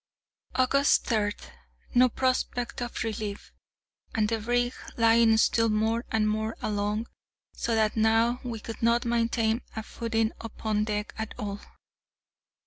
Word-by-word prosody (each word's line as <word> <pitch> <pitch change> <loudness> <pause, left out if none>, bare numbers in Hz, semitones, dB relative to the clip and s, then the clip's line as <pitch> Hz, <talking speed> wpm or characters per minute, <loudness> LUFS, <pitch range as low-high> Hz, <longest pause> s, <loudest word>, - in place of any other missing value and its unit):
August 275 +2 +3
3. 210 -3 +1 0.6
No 250 +1 +6
prospect 245 -1 -1
of 240 -1 -3
relief, 215 -2 -5 0.6
and 215 -2 +2
the 225 -1 0
brig 245 +2 0 0.2
lying 230 -1 +5
still 230 +1 +3
more 220 +2 +1
and 220 -1 +1
more 220 +1 -1
along, 210 +1 -1 0.5
so 230 - -1
that 215 -1 +2
now 225 +2 +3
we 235 -3 -4
could 225 +1 -8
not 235 +1 +3
maintain 230 0 +1
a 220 - -4
footing 225 0 -1
upon 215 -1 -2
deck 210 0 -3
at 220 0 -4
all. 205 -1 -4
225 Hz, 135 wpm, -28 LUFS, 215-235 Hz, 0.6 s, No